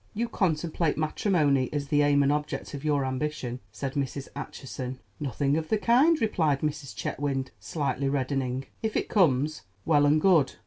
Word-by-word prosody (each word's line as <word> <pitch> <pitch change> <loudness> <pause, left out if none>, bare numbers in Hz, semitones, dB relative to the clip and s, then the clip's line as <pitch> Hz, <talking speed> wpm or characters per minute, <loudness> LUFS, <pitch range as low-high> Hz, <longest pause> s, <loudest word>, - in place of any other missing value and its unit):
"You 235 +3 0
contemplate 165 -5 0
matrimony 155 - +2
as 145 -2 -3
the 145 -1 +3
aim 145 -1 +4
and 140 - +3
object 150 0 -3
of 140 0 -6
your 145 -3 +1
ambition?" 130 -2 -3
said 130 +5 -4
Mrs. 140 -1 -3
Acheson. 130 -2 -6 0.2
"Nothing 140 0 0
of 160 -1 -3
the 220 - +3
kind," 265 +10 +4
replied 160 -10 +1
Mrs. 150 -3 -3
Chetwynd, 135 -2 -2
slightly 140 -3 -2
reddening. 135 -1 -1 0.2
"If 220 -1 -1
it - - -2
comes, 155 - +2 0.2
well 145 -2 +4
and 150 +2 +4
good. 165 -5 +4
145 Hz, 165 wpm, -27 LUFS, 135-155 Hz, 0.2 s, aim